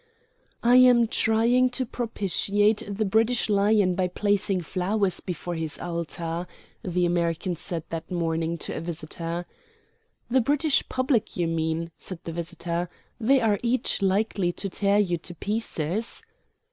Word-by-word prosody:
"I 245 +1 +6
am 250 -2 +6
trying 230 +4 +3
to 260 - 0
propitiate 205 -2 +1
the 205 +2 -1
British 225 +4 +2
Lion 200 -2 +3
by 185 0 0
placing 200 0 0
flowers 190 +3 0
before 175 -1 -5
his 160 -2 -3
altar," 170 0 -4 0.3
the 180 -1 0
American 175 +1 0
said 170 -1 -4
that 165 0 -5
morning 165 -1 -1
to - - -4
a - - -4
visitor. 170 +1 -5 0.8
"The 260 +2 +3
British 290 +4 +2
public 255 -5 0
you 175 - +1
mean," 165 0 -1
said 185 - -5
the 165 - -5
visitor; 170 +1 -3 0.3
"they 260 +3 +4
are 210 -3 +2
each 240 -2 0
likely 195 -1 +1
to 195 - -3
tear 200 +2 +2
you 180 -5 +1
to 175 +1 -9
pieces." 210 - -2
190 Hz, 140 wpm, -26 LUFS, 170-220 Hz, 0.8 s, I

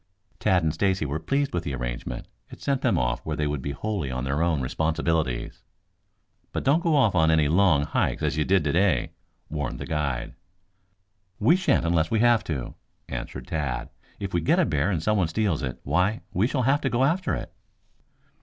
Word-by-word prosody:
Tad 95 -5 +2
and 80 -1 +1
Stacy 95 -1 +1
were 75 +2 -2
pleased 140 - -1
with 85 -1 -1
the 70 -4 -3
arrangement. - - -5 0.2
It - - -11
sent 140 -2 -1
them - - +2
off - - 0
where 75 - -3
they 75 - 0
would 75 -2 -2
be 70 - -4
wholly 95 0 -3
on 65 0 -3
their 70 +4 -1
own 85 -3 +2
responsibilities. 80 -1 -1 0.9
"But - - -3
don't 145 +5 +3
go 165 -3 +2
off 120 -8 +4
on 80 -2 +4
any 80 -2 +4
long 80 -2 +4
hikes - - -1
as - - 0
you 75 - +1
did 95 +1 +2
today," 90 +6 +2 0.4
warned 75 -5 -3
the - - -6
guide. 70 -6 -2 1.0
"We 165 - +4
shan't 185 - +2
unless 85 -1 +2
we 110 - +1
have 120 -1 +4
to," 70 -7 -4 0.4
answered - - -6
Tad. 75 -6 -3 0.3
"If 100 -1 -5
we 85 - +1
get 80 - +3
a - - +4
bear 75 +4 +1
and 85 -6 -1
someone 105 -4 +2
steals 90 -1 0
it, 65 -2 -4
why, 90 +9 +1
we 100 +6 +2
shall 130 -1 -1
have 140 +4 +2
to 135 - 0
go 125 +1 +1
after 170 +7 +1
it." - - -7
80 Hz, 200 wpm, -25 LUFS, 75-105 Hz, 1.0 s, off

